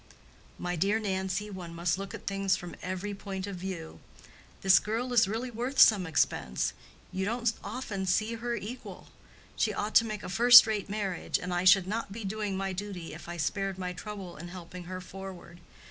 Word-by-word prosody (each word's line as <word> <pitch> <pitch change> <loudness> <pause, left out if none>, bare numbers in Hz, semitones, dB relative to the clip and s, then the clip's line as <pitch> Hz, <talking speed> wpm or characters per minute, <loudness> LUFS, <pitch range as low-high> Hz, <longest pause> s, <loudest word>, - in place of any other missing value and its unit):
"My 175 0 -2
dear 200 +6 +2
Nancy, 190 0 -2
one 175 -3 -7
must 170 +2 0
look 195 0 -5
at - - -11
things 195 -1 +1
from 175 -1 -7
every 185 +3 -4
point 195 -1 -5
of 200 -1 -5
view. 175 -3 -6 0.6
This 190 -2 +7
girl 235 +4 -2
is 225 -3 +5
really 230 +5 -3
worth 245 +4 -4
some 200 -5 +7
expense: 65 - 0 0.4
you 190 - -2
don't 235 +2 0
often 200 -7 -4
see 215 +5 +1
her 235 +1 -2
equal. 235 +4 -8 0.5
She 215 -2 +1
ought 210 +1 -2
to 230 - +6
make 215 -2 -5
a - - -5
first 240 +6 +9
rate 215 -3 -2
marriage, 200 -3 -1
and 180 0 -4
I 175 +1 0
should 185 0 +7
not 215 +1 -3
be 220 +2 -6
doing 205 -1 -2
my 195 0 -2
duty 185 -3 -6
if - - -10
I 175 - -5
spared 195 +4 -1
my 180 -1 -3
trouble 195 -2 -7
in 165 +3 -8
helping 180 0 -9
her 185 +1 -6
forward. 185 -2 -9
195 Hz, 190 wpm, -30 LUFS, 180-215 Hz, 0.6 s, first